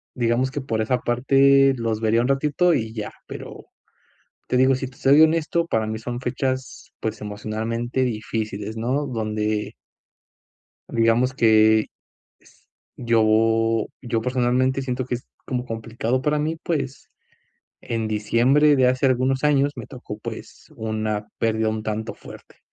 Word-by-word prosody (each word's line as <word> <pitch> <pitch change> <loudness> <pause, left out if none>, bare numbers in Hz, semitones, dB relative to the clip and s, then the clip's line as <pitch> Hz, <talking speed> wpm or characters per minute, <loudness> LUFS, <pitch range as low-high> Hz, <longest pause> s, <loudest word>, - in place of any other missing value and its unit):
digamos 120 +2 +1
que 145 - -4
por 115 -4 -2
esa 125 +3 +1
parte 135 +3 +4
los 115 -2 -2
vería 115 +1 +2
un 125 - 0
ratito, 150 +5 +2
y 110 -1 -2
ya, 110 -2 -5 0.2
pero - - -9 0.8
te 125 - +1
digo, 130 +1 +5
si 130 0 -4
te 135 - -16
soy 145 +1 +5
honesto, 165 +1 +2
para 110 -6 0
mí 110 0 -4
son 120 +1 -5
fechas, 130 +1 -3
pues, 110 0 -4
emocionalmente 110 +4 -3
difíciles, 110 -2 -3
¿no? 130 +6 -1
Donde 110 -3 -2 1.2
Digamos 115 +3 +2
que 110 -2 +4 1.1
yo 115 -1 +2 0.2
yo, 120 -2 -1
personalmente, 125 +2 +1
siento 125 -1 -3
que 125 - -2
es 125 - -7 0.2
como 125 -1 -2
complicado 115 +2 -2
para 150 +2 +1
mí. 155 +2 -1
Pues, 140 -5 -3 0.7
en 115 -2 -3
diciembre 125 +8 +3
de 130 -2 +4
hace 130 +2 +1
algunos 130 +1 +1
años 145 -1 +3
me - - -7
tocó, 125 -6 -9
pues, - - -9
una 110 -1 -3
pérdida 110 -1 +1
un 110 0 -3
tanto 110 +1 -3
fuerte. - - -14
120 Hz, 145 wpm, -23 LUFS, 110-130 Hz, 1.2 s, digo